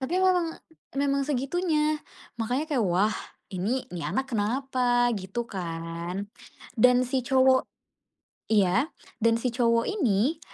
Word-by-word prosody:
tapi 265 +7 -1
memang 365 -2 +3 0.5
memang 280 0 +1
segitunya. 305 +2 0 0.4
Makannya 250 +7 0
kayak, 270 - +2
wah 190 +4 +2 0.4
ini 210 +8 -1
ini 175 - -4
anak 260 - -2
kenapa 245 +2 +1
gitu 200 +5 -4
kan 170 +1 -5 0.5
dan 250 +2 +5
si 260 +1 0
cowok 260 0 +4 0.9
iya, 200 - +3 0.4
dan 230 0 +5
si 250 -1 0
cowok 230 -1 +2
ini 280 - +1
245 Hz, 120 wpm, -27 LUFS, 205-275 Hz, 0.9 s, dan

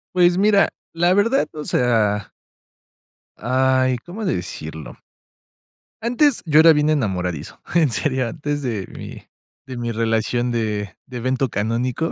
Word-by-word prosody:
Pues, 175 0 +4
mira, 205 0 +4 0.2
la 175 +2 +3
verdad, 230 +8 +2
o 150 -1 -6
sea 110 -7 +1 1.1
Ay, 130 +1 +2
¿cómo 205 +6 -7
decirlo? 80 - -5 1.0
Antes, 245 +4 +2
yo 155 -1 +6
era 165 - +8
bien 150 -1 +2
enamoradizo. 90 - -2 0.2
En 165 -4 +4
serio, 130 -2 -1
antes 145 -2 -3
de 110 -8 -3
mi - - -9 0.5
de 130 - -7
mi 120 -1 -3
relación 115 +2 0
de, 105 -4 -2
de 125 -1 -7
evento 130 +1 -1
canónico, 120 +9 -1
130 Hz, 130 wpm, -21 LUFS, 110-160 Hz, 1.1 s, era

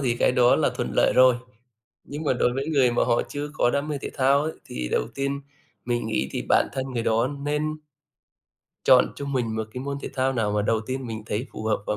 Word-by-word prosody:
thì 120 -4 0
cái - - +3
đó 125 -1 +5
là - - +2
thuận - - -3
lợi - - +4
rồi, 130 0 +7 0.7
nhưng 145 +3 -6
mà 145 - +2
đối 125 -1 +1
với 135 +3 -3
người 135 -5 +3
mà 120 - +2
họ 120 - +2
chưa 145 +1 -4
có 120 - +2
đam 140 +3 -1
mê 150 -2 -2
thể - - -4
thao 140 +1 +3
ấy, 160 +1 -2
thì 60 -1 -5
đầu - - 0
tiên 140 0 -2 0.4
mình 120 -2 -1
nghĩ 110 -11 -1
thì - - -3
bản - - +4
thân 130 - -2
người 120 -2 -1
đó 115 +1 +2 0.2
nên 150 +1 -1 1.1
chọn 125 -1 +5
cho 140 - -5
mình 125 -5 -1
một 110 - -1
cái 125 - -4
môn 140 0 -3
thể - - -4
thao 130 0 +1
nào 110 -5 0
mà 105 0 +1
đầu 110 +1 +1
tiên 130 0 -3
mình 110 -1 -5
thấy 110 +5 -2
phù - - -7
hợp 110 -2 0
và - - -1
125 Hz, 245 wpm, -25 LUFS, 115-140 Hz, 1.1 s, rồi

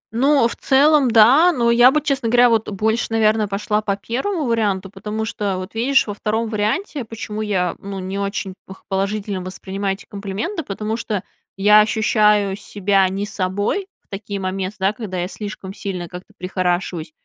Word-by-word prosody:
Ну, 270 0 +4
в - - -5
целом 280 0 +4
да, 250 +10 +6
но 235 -7 +2
я 240 +2 +7
бы, 305 - +2
честно 275 -5 -1
говоря, 245 +1 +5
вот 225 -1 +1
больше, 220 +3 0
наверное, 220 -1 +2
пошла 210 +2 -1
по 200 -2 -1
1 300 - -2
варианту. 205 -5 0
Потому 210 +2 -4
что 205 -4 -2
вот, 185 +2 -7
видишь, 255 +5 +2
во 205 - -4
2 220 +2 -2
варианте, 225 - -1
почему 215 -1 -6
я, 190 -4 0
ну, 200 0 -7
не 190 +1 -4
очень 200 -1 -3
п 190 - -9
положительно 195 0 -2
воспринимаю 195 +1 -4
эти 205 - -15
комплименты, 205 - -4
потому 215 -1 -3
что 210 -5 -3 0.3
я 210 +2 +6
ощущаю 210 -2 +2
себя 195 -2 +1
не 195 +2 -3
собой 205 - -2
в - - -45
такие 200 0 -6
момен 185 0 -2
да, 190 +2 +2
когда 215 -6 -6
я 175 0 -1
слишком 200 -1 -7
сильно 185 -4 -5
как-то 180 +2 -11
прихорашиваюсь, 180 -3 -2
210 Hz, 175 wpm, -20 LUFS, 195-230 Hz, 0.3 s, я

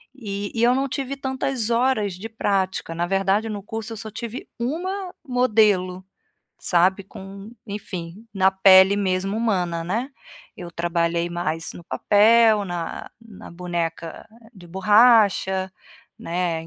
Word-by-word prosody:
e 205 -5 -5
e 230 - 0
eu 245 +1 +4
não 275 +1 0
tive 275 0 -4
tantas 265 -3 -2
horas 230 -5 +1
de 210 +5 -8
prática. 190 -5 -1
Na 175 +1 -1
verdade, 195 +3 +1
no 205 -2 -5
curso 225 +1 -6
eu - - -7
só 220 +1 -7
tive 235 +2 -7
1 360 +9 -3
modelo, 210 -7 +2 0.5
sabe, 185 +2 +2
com 195 +2 -11 0.2
enfim, 200 0 -7
na 190 0 +4
pele 190 +1 +6
mesmo 195 0 -1
humana, 180 -7 -1
né. 230 +10 -2 0.5
Eu 175 -1 -8
trabalhei 170 0 -1
mais 165 -1 -3
no 170 - -12
papel, 215 +1 +4
na 175 -3 -5
na 225 -4 -13
boneca 170 -1 -5 0.3
de 175 -3 -14
borracha, 190 -1 +3 0.5
né, 170 -2 -3
195 Hz, 135 wpm, -22 LUFS, 180-225 Hz, 0.5 s, pele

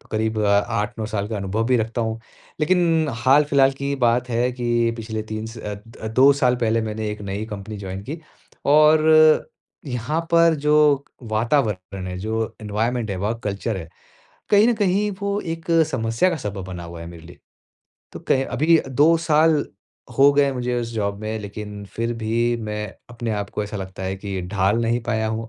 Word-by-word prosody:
तो - - -24
करीब 110 0 0
8-9 105 +2 0
साल 105 -2 -3
का 110 - -3
अनुभव 100 +3 -1
भी 125 0 +3
रखता 115 +1 -1
हूँ 110 0 -2 0.4
लेकिन 165 -1 +2 0.2
हाल-फिलहाल 140 0 +4
की 135 +1 -7
ही 140 - 0
बात 120 +2 +1
है 120 +1 +1
कि 120 -1 +1
पिछले 110 -1 -4
3 110 0 -5
स 115 +1 -9
अ, 105 +1 -7
2 130 +5 +5
साल 125 -3 +2
पहले 115 -1 +1
मैंने 110 0 -3
एक 105 - -6
नई 100 +2 -4
कंपनी 105 0 -7
जॉइन 95 0 -6
की 155 +4 -4 0.5
और 155 +1 +5 0.4
यहाँ 130 +5 -2
पर 170 -1 +5
जो, 150 -1 +3 0.2
वातावरण 110 -5 -1
है 90 0 -5
जो 110 +3 -2
एनवायरनमेंट 110 +2 -2
है 95 - -2
वर्क 105 +5 -2
कल्चर 105 +2 -2
है। 85 -3 -7 0.6
कहीं 210 +2 +5
न 240 - +4
कहीं 205 0 +1
वो 200 0 -1
एक 165 -1 -5 0.3
समस्या 115 +6 +1
का 175 - -1
सबब 100 -7 -5
बना 90 -2 -7
हुआ 85 0 -9
है - - -7
मेरे 85 -1 -11
लिए। 85 - -14 0.7
तो - - -8
कह 135 - +1
अभी 165 +2 +4
2 150 +6 +4
साल, 155 -2 +3 0.5
हो 140 +1 +7
गए 140 -1 +3
मुझे 125 -1 -2
इस 115 - -4
जॉब 100 -2 -2
में 110 +1 -3
लेकिन 105 0 -7
फिर 115 +1 -1
भी 115 +2 0
मैं 105 0 -3 0.2
अपने 120 -1 -4
आप 100 -1 -3
को 105 - -3
ऐसा 105 +1 -5
लगता 95 -1 -7
है 95 +1 -3
कि 95 -1 -5
ढाल 100 +2 +1
नहीं 115 +1 +1
पाया 110 -2 0
हूँ 110 +1 -4
115 Hz, 190 wpm, -22 LUFS, 105-140 Hz, 0.7 s, हो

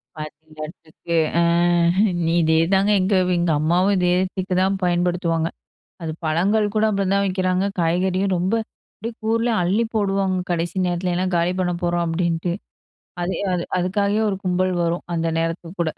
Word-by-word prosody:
"பாத்திங்களா, 155 0 -8 0.2
ட்ரிக்கு. 165 +1 -4 0.2
ஆ - - +4 1.0
இதேதாங்க 165 +5 +3
எங்க 190 +2 +1 0.2
எங்கம்மாவும் 170 +4 +2
இதே 180 -1 +2 0.2
ட்ரீக்கு 185 0 -3
தா - - +4 0.2
பயன்படுத்துவாங்க." 175 -2 +1 0.5
அது 160 -1 -3
பழங்கள் 190 +7 +2
கூட 215 0 +2
அப்படி 200 -2 0
தான் 200 0 +2
விக்கிறாங்க, 185 0 0
காய்கறியும் 185 +3 +1
ரொம்ப 185 +5 0 0.4
அப்டியே 230 +3 -5
கூர்லயு 230 +1 +1
அள்ளி 195 +7 +1
போடுவாங்க. 195 -3 +1
"கடைசி 170 +1 -1
நேரத்துல 175 0 -1
ஏனா 185 +1 0
காலி 170 +1 +1
பண்ண 180 -1 0
போறோம்" 175 0 +1
அப்படின்ட்டு. 170 0 -1 0.7
அது 180 +2 -1 0.2
அது 175 -1 -1
அதுக்காகவே 200 +3 +1
ஒரு 195 - -2
கும்பல் 185 0 +1
வரும், 170 +1 -1
அந்த 165 0 -1
நேரத்துக்கு 165 +2 -4
கூட. 160 - 0
180 Hz, 145 wpm, -22 LUFS, 170-195 Hz, 1.0 s, ஆ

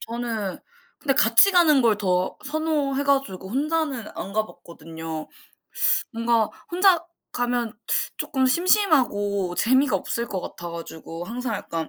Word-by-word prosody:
저는 225 -5 -4 0.4
근데 275 -3 0
같이 235 - +6
가는 330 -7 +5
걸 230 -4 +3
더 185 -3 0
선호해 295 -2 -1
가지고 270 -10 0
혼자는 285 -1 -1
안 195 - -6
가봤거든요. 165 -6 -6 0.8
뭔가 230 -1 +1 0.2
혼자 355 -1 +4 0.3
가면 245 -2 -1 0.4
쪼끔 265 -2 0
심심하고 255 - +2
재미가 260 +3 +3
없을 235 0 -3
것 190 - -4
같아 175 0 -7
가지고 165 0 -8
항상 235 +3 -4
약간 165 -5 -4
235 Hz, 265 characters per minute, -24 LUFS, 195-280 Hz, 0.8 s, 같이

